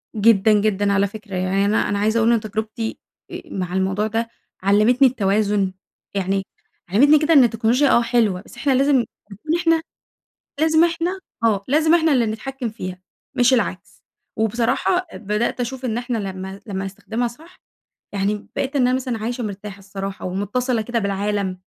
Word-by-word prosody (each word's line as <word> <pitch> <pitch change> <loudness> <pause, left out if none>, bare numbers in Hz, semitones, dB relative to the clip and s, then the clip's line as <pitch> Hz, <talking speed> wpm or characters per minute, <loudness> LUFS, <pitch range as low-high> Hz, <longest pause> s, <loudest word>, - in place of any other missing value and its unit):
جدًا 215 0 +4
جدًا 205 -1 +2
على 200 0 +2
فكرة، 205 -1 -9
يعني 185 +2 +1
أنا 210 +2 +1
أنا 200 0 0
عايزة 220 +2 +1
أقول 225 +1 +4
إن 235 - +3
تجربتي 220 +1 -4 0.3
آآ - - -6
مع 180 -2 -4
الموضوع 190 +3 0
ده 225 +1 -2 0.3
علمتني 215 +7 +5
التوازن، 205 -4 +1 0.4
يعني 195 0 0 0.5
علمتني 285 +10 +5
كده 320 +2 +2
إن 275 - +8
التكنولوجيا 240 +4 +2
آه 235 - +5
حلوة، 230 -6 +1
بس 225 - -16
إحنا 275 +3 0
لازم 275 +2 +3 0.4
نكون 310 - -2
إحنا 330 -1 +3 0.8
لازم 320 +1 +4
إحنا، 345 +3 -1 0.3
آه، 205 -3 +2
لازم 315 +4 +4
إحنا 320 -3 +3
اللي 245 -3 +3
نتحكم 245 +3 -4
فيها، 185 -4 -6 0.4
مش 255 0 +4
العكس، 185 -7 -3 0.3
وبصراحة، 240 - +1
بدأت 215 +4 -2
أشوف 255 +2 -4
إن 235 -1 -1
احنا 240 -1 -2
لما 190 -1 -6
لما 195 -2 -3
نستخدمها 220 +5 -3
صح، 320 +10 -15 0.6
يعني 205 +1 -1
بقيت 275 +1 -2
إن 275 - +3
أنا 250 - +2
مثلًا 255 -3 -2
عايشة 240 +3 -3
مرتاحة 200 -1 -6
الصراحة 195 0 -6
ومتصلة 215 +6 -1
كده 230 +1 -1
بالعالم، 200 -1 -1
220 Hz, 165 wpm, -21 LUFS, 200-250 Hz, 0.8 s, إن